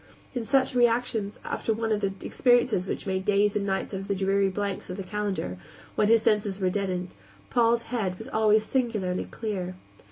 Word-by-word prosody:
In 245 -3 -2
such 260 +3 +2
reactions, 235 -4 +1
after 225 - -1
one 225 0 -1
of 210 - +2
the 195 -1 0
experiences 245 -6 +2
which - - -3
made 190 -1 -1
days 205 +1 +2
and 200 -1 0
nights 190 +1 -2
out 195 - -2
of 195 - -7
the 200 - 0
dreary 195 +1 +2
blanks 200 0 -3
of 180 - -5
the 195 - -4
calendar, 190 - -3 0.3
when 210 - +2
his 225 0 +5
senses 205 -2 +1
were 185 -2 +1
deadened, 185 -2 -2 0.4
Paul's 235 -1 +3
head 210 -7 -2
was 220 - -8
always 215 -3 +3
singularly 215 -9 -1
clear. 190 -5 -4
205 Hz, 190 wpm, -27 LUFS, 190-225 Hz, 0.4 s, his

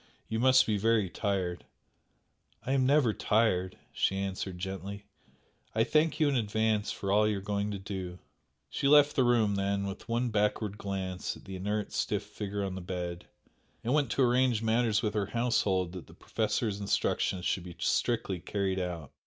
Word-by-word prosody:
You 110 - -2
must 130 +1 +6
be 105 -2 0
very 110 -3 +2
tired." 95 -4 -2 1.0
"I 130 - -1
am 135 -1 +3
never 140 -5 +4
tired" 105 -5 +1 0.2
she 95 - +1
answered, 95 -1 -3
gently 95 +2 -6 0.7
"I 110 - +4
thank 155 +6 +2
you 155 - +4
in 140 - +1
advance 110 -2 +1
for 100 - -3
all 105 +1 +4
you 105 -1 0
are - - -3
going 100 +1 -2
to 100 - -3
do!" 95 -2 -6 0.5
She 140 - -1
left 145 0 +6
the 130 - +4
room 115 -4 +3
then, 100 0 0
with 100 +3 -7
one 120 +1 0
backward 105 0 0
glance 95 -2 -3
at - - -17
the 95 -1 -7
inert 105 +3 -2
stiff 105 -1 -1
figure 100 -1 -4
on 95 - -3
the 95 - -5
bed, 90 -1 -5 0.6
and 120 - 0
went 145 -4 +2
to 135 - +2
arrange 125 -2 +3
matters 110 -1 +2
with 105 -1 0
her 105 -2 0
household 100 -6 +1
that 90 -1 -9
the - - -15
Professor's 110 -1 -1
instructions 95 -2 0
should 90 - 0
be 85 -2 -9
strictly 105 -6 0
carried 95 +2 -1
out. 85 -5 -4
105 Hz, 180 wpm, -30 LUFS, 95-115 Hz, 1.0 s, must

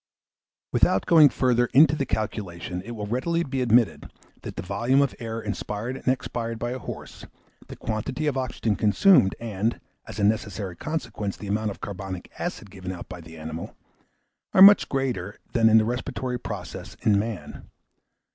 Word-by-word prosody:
Without 95 - +3
going 155 -4 +7
further 120 -2 +2
into 150 +1 +7
the 140 -2 -2
calculation, 90 -5 -3
it 120 +4 -7
will 105 -2 -4
readily 165 +10 0
be 135 -3 -3
admitted, 120 -2 +2 0.3
that - - -7
the - - -5
volume 120 +8 +1
of 140 -2 +2
air 115 -1 -4
inspired 105 +2 -4
and 135 - -11
expired 120 -3 -1
by 120 +1 -3
a 130 - -4
horse, - - -9 0.4
the - - -9
quantity 120 +7 -3
of 145 -3 0
oxygen 120 -4 -1
consumed, 105 - +4
and, 110 0 -2 0.3
as - - -8
a 105 - -1
necessary 100 -3 0
consequence, 115 - -4
the 105 - -9
amount 105 +2 -1
of 100 - -8
carbonic 95 -2 -6
acid 100 - -5
given 95 -2 -6
out 90 -2 -8
by 90 -1 -8
the 80 0 -12
animal, 80 +1 -7 0.8
are 190 - +8
much 205 +1 +8
greater 120 -8 -2 0.2
than 115 -2 +5
in 110 - +7
the 110 - +4
respiratory 125 +1 -3
process - - -7
in 105 -2 +4
man. 105 -8 -6
110 Hz, 170 wpm, -25 LUFS, 100-130 Hz, 0.8 s, are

